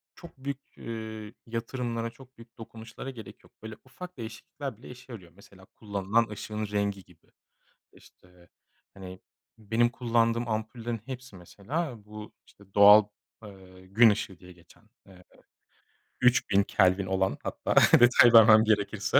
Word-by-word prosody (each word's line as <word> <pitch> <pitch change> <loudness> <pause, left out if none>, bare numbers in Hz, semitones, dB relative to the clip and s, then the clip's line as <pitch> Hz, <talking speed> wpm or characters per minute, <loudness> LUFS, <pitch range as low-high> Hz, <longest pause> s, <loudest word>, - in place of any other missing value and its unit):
çok 170 -5 -14
büyük, 140 0 -6 0.2
eee, 110 -1 -8
yatırımlara 115 0 -4
çok 130 +2 -19
büyük 115 +1 -17
dokunuşlara 115 +3 -10
gerek 115 -6 -12
yok. - - -22
Böyle 110 0 -8
ufak 180 +7 -11
değişiklikler 115 +2 -8
bile 120 - -14
işe 125 +1 -13
yarıyor. 90 -6 -12
Mesela 95 -1 -18
kullanılan 100 +3 -2
ışığın 105 0 -6
rengi 100 -1 -3
gibi. 90 -3 -25 0.6
İşte, 90 -1 -22 0.4
hani, 95 -1 -11 0.4
benim 115 +2 0
kullandığım 115 -1 0
ampullerin 110 +1 -4
hepsi 130 -4 -9
mesela 115 - -6
bu, 105 0 -11
işte, 100 -1 -22
doğal, 105 +1 +8 0.4
eee, 95 -2 -15
gün 110 +4 +5
ışığı 100 -3 -3
diye 90 0 -15
geçen, 85 -2 -21 0.2
eee, 90 -2 -17 1.0
3000 120 -5 +3
kelvin 95 0 +1
olan 95 0 -1
hatta - - -3 0.2
detay 120 -1 +6
vermem 110 -1 +8
gerekirse. 105 -2 +1
110 Hz, 135 wpm, -27 LUFS, 100-120 Hz, 1.0 s, doğal